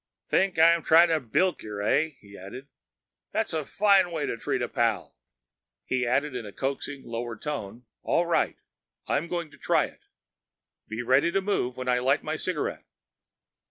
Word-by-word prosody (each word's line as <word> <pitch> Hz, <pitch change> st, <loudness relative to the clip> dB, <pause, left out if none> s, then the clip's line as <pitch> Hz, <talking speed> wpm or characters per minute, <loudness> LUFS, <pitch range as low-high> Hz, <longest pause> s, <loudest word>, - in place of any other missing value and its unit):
"Think 190 Hz, -2 st, +1 dB
I'm 165 Hz, +1 st, +6 dB
tryin' 165 Hz, +2 st, +6 dB
to 160 Hz, -1 st, +2 dB
bilk 175 Hz, +9 st, 0 dB
yer, 105 Hz, -1 st, -6 dB
eh?" 155 Hz, +9 st, +1 dB
he 100 Hz, -1 st, -14 dB
added. 100 Hz, +10 st, -9 dB, 0.7 s
"That's -, -, -1 dB
a 160 Hz, -1 st, -1 dB
fine 195 Hz, +2 st, +3 dB
way 160 Hz, -3 st, -2 dB
to -, -, -2 dB
treat 115 Hz, -, -2 dB
a -, -, -1 dB
pal!" -, -, -1 dB, 0.7 s
He 125 Hz, -1 st, 0 dB
added 140 Hz, +4 st, +1 dB
in 125 Hz, -, -3 dB
the 105 Hz, -, -8 dB
coaxing 135 Hz, +3 st, -4 dB
lower 115 Hz, 0 st, -4 dB
tone, 120 Hz, -4 st, -5 dB, 0.2 s
"All 175 Hz, -, +1 dB
right, 170 Hz, -, +1 dB, 0.5 s
I'm 150 Hz, +4 st, 0 dB
going 170 Hz, -3 st, -4 dB
to -, -, -17 dB
try -, -, +2 dB
it. -, -, -14 dB, 0.9 s
Be 110 Hz, +2 st, -4 dB
ready 130 Hz, +7 st, +3 dB
to 195 Hz, -, +2 dB
move 190 Hz, -11 st, -1 dB
when 130 Hz, 0 st, -5 dB
I 125 Hz, -1 st, +3 dB
light 135 Hz, +4 st, +2 dB
my 155 Hz, +1 st, -2 dB
cigarette." 165 Hz, -1 st, -3 dB
145 Hz, 175 wpm, -27 LUFS, 120-170 Hz, 0.9 s, I'm